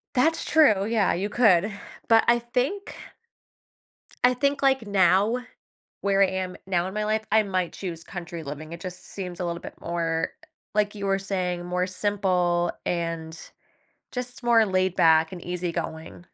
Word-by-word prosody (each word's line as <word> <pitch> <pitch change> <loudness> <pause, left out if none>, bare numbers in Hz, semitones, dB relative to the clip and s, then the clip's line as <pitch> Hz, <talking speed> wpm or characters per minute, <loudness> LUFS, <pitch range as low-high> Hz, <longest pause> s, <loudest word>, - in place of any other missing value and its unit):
That's 320 +6 +2
true, 220 -12 +4
yeah, 220 -2 +2
you 195 +4 -2
could, 205 -4 +4 0.4
but 225 -1 +6
I 240 0 +5
think 250 +12 -2 1.3
I 250 0 +6
think, 280 +2 0
like, 265 -4 +3
now, 200 +5 +3 0.6
where 195 0 +2
I 195 - +6
am 185 -1 -3
now 180 -1 0
in 190 - -6
my 210 0 -1
life, 215 0 0
I 220 0 +5
might 185 -3 -2
choose 170 -4 -6
country 170 -2 -7
living, 150 +2 -7
it 170 - -9
just 180 -1 -8
seems 180 -3 -6
a 180 - -1
little 170 0 -3
bit - - -9
more, 165 -1 -1 0.4
like 210 0 +1
you 200 - -4
were 195 0 +1
saying, 180 -3 -2
more 180 +1 0
simple 185 -3 +1
and 165 -2 -3 0.7
just 250 0 -6
more 230 -2 +5
laid 185 -1 +1
back 160 0 +4
and 180 - -8
easy-going. 170 -2 -4
190 Hz, 160 wpm, -25 LUFS, 175-220 Hz, 1.3 s, but